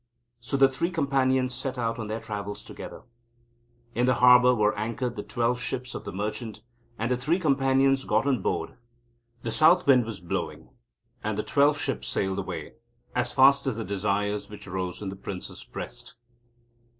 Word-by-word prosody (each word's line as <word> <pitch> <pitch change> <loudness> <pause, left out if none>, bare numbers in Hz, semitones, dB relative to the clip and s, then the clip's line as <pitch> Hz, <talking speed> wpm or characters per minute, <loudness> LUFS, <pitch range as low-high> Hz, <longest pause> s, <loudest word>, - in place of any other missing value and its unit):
So 120 +4 -2
the 135 0 +7
Three 135 +6 -2
Companions 130 -5 +1
set 130 +1 -3
out 115 -1 -1
on 110 - -4
their 110 +1 -3
travels 105 -2 -5
together. - - -9 0.9
In 120 +1 +1
the 130 - +4
harbour 125 0 +7
were 105 -1 +2
anchored 115 +3 -3
the - - -4
twelve 120 -1 -1
ships 125 +2 -3
of - - -7
the - - -5
merchant, 105 +2 -4 0.3
and 115 +3 -1
the 125 - +2
Three 150 +8 +1
Companions 135 -4 +3
got 110 +3 +2
on 130 -7 +1
board. 85 0 -2 0.7
The 115 - -2
south 165 +8 +5
wind 130 -4 +5
was 110 -3 -6
blowing, 85 -1 -4 0.5
and 105 -1 -2
the 105 - -1
twelve 145 +1 +3
ships 135 -4 -2
sailed 95 0 -1
away, 90 -3 -6 0.4
as 125 0 0
fast 140 +1 +5
as 130 - 0
the 115 -1 -4
desires 100 +1 -1
which 105 -1 -9
rose 95 0 -4
in 100 - -3
the 95 - -6
Prince's 95 -1 -7
breast. - - -8
120 Hz, 175 wpm, -27 LUFS, 105-135 Hz, 0.9 s, the